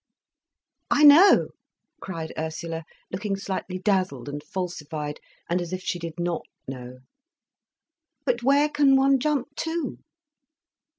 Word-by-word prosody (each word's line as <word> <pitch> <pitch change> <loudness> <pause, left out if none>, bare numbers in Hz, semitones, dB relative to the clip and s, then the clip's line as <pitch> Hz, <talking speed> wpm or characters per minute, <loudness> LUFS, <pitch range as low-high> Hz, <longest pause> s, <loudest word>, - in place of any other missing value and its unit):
"I 295 - +3
know!" 305 +7 +8 0.5
cried 165 -4 -6
Ursula, 160 +1 -4 0.3
looking 195 +2 -2
slightly 190 -1 -4
dazzled 185 - 0
and 145 +1 -5
falsified, 155 -4 -5 0.3
and 175 +1 0
as 175 +1 -5
if 185 0 -4
she 175 - -2
did 165 0 -7
not 175 -1 -1 0.3
know. 130 -1 -8 1.2
"But 245 -3 +1
where 280 +4 +4
can 290 -2 +4
one 270 0 +4
jump 285 0 -1
to?" 330 0 -3
185 Hz, 120 wpm, -25 LUFS, 160-270 Hz, 1.2 s, know